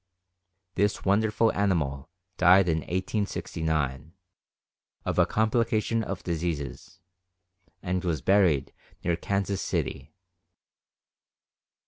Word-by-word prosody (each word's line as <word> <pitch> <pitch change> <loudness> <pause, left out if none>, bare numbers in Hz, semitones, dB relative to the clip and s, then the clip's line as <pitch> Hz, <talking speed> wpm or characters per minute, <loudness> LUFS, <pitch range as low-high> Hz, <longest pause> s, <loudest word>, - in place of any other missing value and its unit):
This 100 +1 0
wonderful 110 +3 +2
animal 80 -9 0 0.3
died 90 +1 +6
in 80 -1 +2
1869, 80 - -2 0.9
of - - 0
a - - +5
complication 110 0 +1
of 95 -3 -5
diseases, 85 0 -4 0.8
and 90 0 -1
was 80 -7 -1
buried 90 -9 +3 0.3
near 85 -1 +1
Kansas 100 +2 -2
City. - - -3
90 Hz, 85 wpm, -27 LUFS, 80-100 Hz, 0.9 s, died